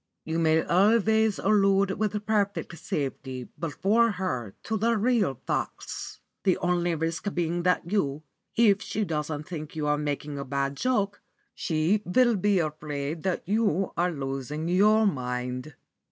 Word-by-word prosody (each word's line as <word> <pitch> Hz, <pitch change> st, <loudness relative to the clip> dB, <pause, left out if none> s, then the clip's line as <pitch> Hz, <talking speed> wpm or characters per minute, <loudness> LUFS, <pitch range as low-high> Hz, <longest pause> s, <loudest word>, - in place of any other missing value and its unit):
You 160 Hz, +1 st, -2 dB
may 160 Hz, 0 st, +3 dB
always 220 Hz, +2 st, +3 dB
allude 195 Hz, -1 st, +3 dB
with 210 Hz, -1 st, -1 dB
perfect 200 Hz, -4 st, 0 dB
safety 130 Hz, -3 st, -4 dB
before 205 Hz, -, +2 dB
her 130 Hz, -, -3 dB
to 220 Hz, -, -2 dB
the 230 Hz, +2 st, +2 dB
real 215 Hz, -, +2 dB
facts, -, -, -4 dB, 0.2 s
the 185 Hz, -, +3 dB
only 175 Hz, -1 st, +1 dB
risk 165 Hz, +5 st, -2 dB
being 175 Hz, 0 st, 0 dB
that, 180 Hz, +1 st, +2 dB, 0.7 s
if 210 Hz, -3 st, +4 dB
she 215 Hz, -1 st, -2 dB
doesn't 150 Hz, -2 st, -3 dB
think 155 Hz, -4 st, -7 dB
you 155 Hz, -1 st, -2 dB
are 150 Hz, 0 st, +1 dB
making 145 Hz, -1 st, -3 dB
a -, -, -3 dB
bad 140 Hz, +1 st, -2 dB
joke, 205 Hz, -, 0 dB, 0.3 s
she 165 Hz, +6 st, +1 dB
will 240 Hz, +5 st, +3 dB
be 200 Hz, +1 st, +2 dB
afraid 155 Hz, -1 st, -3 dB
that 185 Hz, -1 st, -2 dB
you 200 Hz, -3 st, +1 dB
are 175 Hz, +1 st, +2 dB
losing 140 Hz, +1 st, -4 dB
your 210 Hz, +4 st, +4 dB
mind." 125 Hz, -3 st, -2 dB
175 Hz, 140 wpm, -27 LUFS, 150-205 Hz, 0.7 s, if